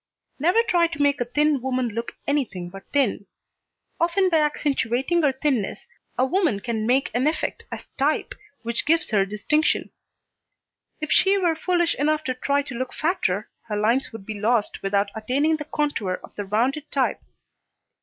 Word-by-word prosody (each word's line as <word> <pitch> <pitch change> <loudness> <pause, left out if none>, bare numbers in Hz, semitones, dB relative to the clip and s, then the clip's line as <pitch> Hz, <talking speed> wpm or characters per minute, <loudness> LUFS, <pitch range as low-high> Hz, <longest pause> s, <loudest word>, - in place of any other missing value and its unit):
Never 360 +10 +4
try 345 -6 +3
to 315 -2 -8
make 285 -2 +2
a - - +1
thin 295 +2 +2
woman 255 -1 0
look 230 +2 -4
anything 235 -12 -1
but 195 0 -11
thin. 250 -8 +1 0.7
Often 370 +3 +2
by 330 - +3
accentuating 290 0 +1
her 290 -3 +3
thinness, 265 -6 -1 0.3
a 255 - +3
woman 315 - +1
can 220 +1 -2
make 260 +3 +2
an 255 +4 +2
effect 310 - -2
as - - -6
type, 290 +3 +1 0.3
which 235 +3 -2
gives 330 -2 +2
her 195 -2 +3
distinction. 300 +10 0 1.1
If 305 - -3
she 390 +1 +5
were 350 -4 +2
foolish 345 +1 +1
enough 305 +2 +1
to 260 - -1
try 280 +3 0
to 275 - -8
look 255 +2 -4
fatter, 220 - 0 0.2
her 210 - -2
lines 230 +6 +1
would 225 -3 -9
be 215 -1 -6
lost 220 0 +1
without 200 +1 0
attaining 275 +8 +1
the 300 - -6
contour 290 -12 -1
of - - -13
the 205 - -4
rounded 255 +9 0
type. 270 -2 0
270 Hz, 170 wpm, -24 LUFS, 225-310 Hz, 1.1 s, she